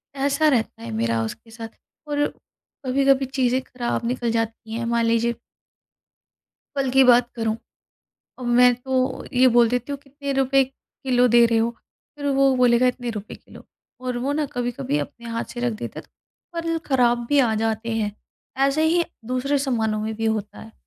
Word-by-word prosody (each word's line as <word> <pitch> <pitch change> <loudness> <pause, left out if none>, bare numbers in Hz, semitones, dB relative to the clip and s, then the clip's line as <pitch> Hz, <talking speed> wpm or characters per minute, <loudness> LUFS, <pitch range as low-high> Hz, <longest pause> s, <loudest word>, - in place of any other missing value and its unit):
ऐसा 280 +3 +2
रहता 235 - 0
है 115 - -6
मेरा 115 +1 0
उसके 225 - -7
साथ। 225 0 -8 0.4
और 290 0 +1 0.6
कभी-कभी 270 +1 +3
चीज़ें 260 -1 0
ख़राब 245 -2 -3
निकल 240 -1 -1
जाती 225 0 -3
हैं 230 +1 -2
मान 235 0 +1
लीजिए 230 +1 +2 1.4
कल 270 -1 +1
की 270 +1 +6
बात 245 -1 +5
करूँ, 225 -1 -1 0.8
अब 255 - -7
मैं 250 0 +7
तो 260 +1 -1
ये 255 +1 +5
बोल 240 -1 +6
देती 250 +3 -2
हूँ 280 - -4
कितने 280 0 -5
रुपए 270 0 +3
किलो 255 -1 -1
दे 235 0 +6
रहे 230 -1 +2
हो? 230 +1 +1 0.5
फ़िर 285 -1 -5
वो 270 0 +4
बोलेगा 250 0 +4
इतने 245 -1 -1
रुपए 215 -2 -7
किलो - - -15 0.4
और 250 -1 -1
वो 270 +4 -1
ना 300 0 0
कभी-कभी 240 - -2
अपने 235 +11 -6
हाथ 230 0 -2
से 240 - -5
रख 245 -1 0
देते 215 - -6
हैं - - -19
तो 340 - -14
फल 330 0 -1
ख़राब 240 -3 +2
भी 290 - +3
आ 240 -5 +3
जाते 225 +1 -1
हैं। 210 -2 -1 0.5
ऐसे 280 +3 +1
ही 340 +2 +3 0.2
दूसरे 255 +4 0
सामानों 225 -6 0
में 220 0 -3
भी 225 +1 -4
होता 215 -2 -2
है। 220 - -12
245 Hz, 180 wpm, -23 LUFS, 225-270 Hz, 1.4 s, मैं